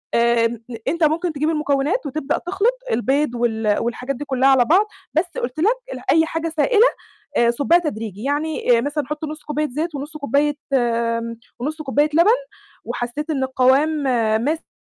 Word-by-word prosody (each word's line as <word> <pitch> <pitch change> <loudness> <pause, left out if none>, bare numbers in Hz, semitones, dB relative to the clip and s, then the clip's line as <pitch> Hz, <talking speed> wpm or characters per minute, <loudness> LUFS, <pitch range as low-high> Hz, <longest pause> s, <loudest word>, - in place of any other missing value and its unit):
آمم، 235 -1 +2 0.2
أنت 335 -1 0
ممكن 325 +2 +1
تجيب 305 +2 0
المكونات 300 - 0
وتبدأ 285 0 -2
تخلط 405 +8 0
البيض 270 - +1
وال 220 -3 +1
والحاجات 250 +3 -3
دي 290 - -6
كُلّها 265 0 +2
على 255 -3 +5
بعض، 380 +7 +4 0.3
بس 320 +4 +2
قلت 250 +5 -4
لك 435 +9 +3 0.2
ال - - -7
أي 320 0 +4
حاجة 325 0 -3
سائلة 425 +10 +4 0.5
آآ، 235 0 +4
صُبّها 285 +8 +3
تدريجي، 220 - -5
يعني 290 -4 +1
آآ - - +2
مثلًا 290 +3 -2
حط 300 +1 -5
نُصّ 305 0 -6
كوباية 300 0 -1
زيت 310 +5 -3
ونُصّ 290 +2 -6
كوباية 285 +1 +1 1.0
ونُصّ 310 +4 -3
كوباية 290 +2 +2
لَبَن، 340 +6 +5 0.5
وحسيت 270 +6 -4
إن 270 -4 0
القوام 260 +3 +3 0.6
ماسك 315 +3 -1
295 Hz, 160 wpm, -21 LUFS, 255-315 Hz, 1.0 s, على